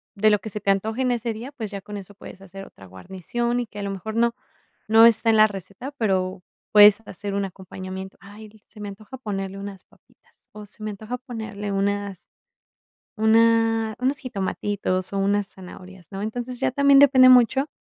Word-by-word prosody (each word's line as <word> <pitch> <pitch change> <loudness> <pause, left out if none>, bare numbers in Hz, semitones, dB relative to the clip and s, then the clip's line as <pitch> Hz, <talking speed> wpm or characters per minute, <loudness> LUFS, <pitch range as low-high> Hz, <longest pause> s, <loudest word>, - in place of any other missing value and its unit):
de 215 +2 +3
lo 210 -1 +3
que 220 - -8
se 210 - -5
te 200 - -3
antoje 220 +5 0
en 250 - +1
ese 235 -1 -2
día, 235 +6 -8
pues 220 -6 -6
ya 200 -1 -6
con 210 +1 -9
eso 200 0 -10
puedes 195 - -12
hacer 195 +1 -10
otra 95 - -16
guarnición 190 - -4
y - - -4
que 210 - -11
a 200 - -4
lo 200 - -3
mejor 195 +3 -6
no 235 0 +2 0.5
no 225 +1 +7
está 225 0 +3
en 220 - +4
la 215 0 +7
receta, 200 - -8
pero 190 -6 -1 0.3
puedes 210 0 +8
hacer 200 +2 -6
un 200 - -1
acompañamiento, 190 0 -8
"Ay", 210 +2 -13
dices, 210 0 -23
"Se 215 - -14
me 205 - -5
antoja 210 +5 -10
ponerle 195 -4 -5
unas 200 -1 -9
papitas, - - -30
o 210 0 -10
se 215 +2 -9
me 215 - -3
antoja 215 +4 -6
ponerle 220 -5 -6
unas 200 -1 -2 0.9
una 225 0 +3
unos 265 +3 0
jitomatitos, 200 -5 -2
o 195 - -1
unas 200 +1 +1
zanahorias", 185 -1 -12
¿no? 195 +1 -6
Entonces, 245 +3 -5
ya 265 - 0
también 280 +1 +5
depende 260 -2 +7
mucho 255 +3 +5
210 Hz, 200 wpm, -23 LUFS, 195-230 Hz, 0.9 s, puedes